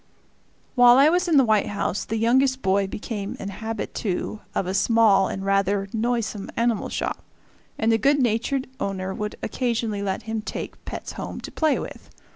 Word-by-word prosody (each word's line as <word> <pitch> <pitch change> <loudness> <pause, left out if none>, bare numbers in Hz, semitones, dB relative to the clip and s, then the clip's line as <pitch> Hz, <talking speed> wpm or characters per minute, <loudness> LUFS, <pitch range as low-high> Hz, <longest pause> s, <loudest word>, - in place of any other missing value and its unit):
While 245 -1 +7
I 280 +3 +7
was 360 +2 +1
in 325 -4 +4
the 265 - +6
White 215 -2 +3
House 200 -1 -2
the 225 - -2
youngest 260 +4 +2
boy 195 0 +2
became 205 0 -5
an 195 - -5
habitue 215 -1 -4 0.2
of - - 0
a 185 - -2
small 205 -1 +4
and 195 0 -4
rather 195 0 +1
noisome 225 -3 -1
animal 235 -2 +1
shop, - - -3 0.6
and 225 +1 +2
the 225 - +3
good 280 +6 +4
natured 255 +2 0
owner 190 -3 -3
would 210 +1 -4
occasionally 230 -4 -1
let 195 -1 -2
him 220 -1 -3
take - - -6
pets - - -6
home - - -6
to - - -8
play 315 -2 +2
with. - - -8
220 Hz, 175 wpm, -24 LUFS, 200-245 Hz, 0.6 s, While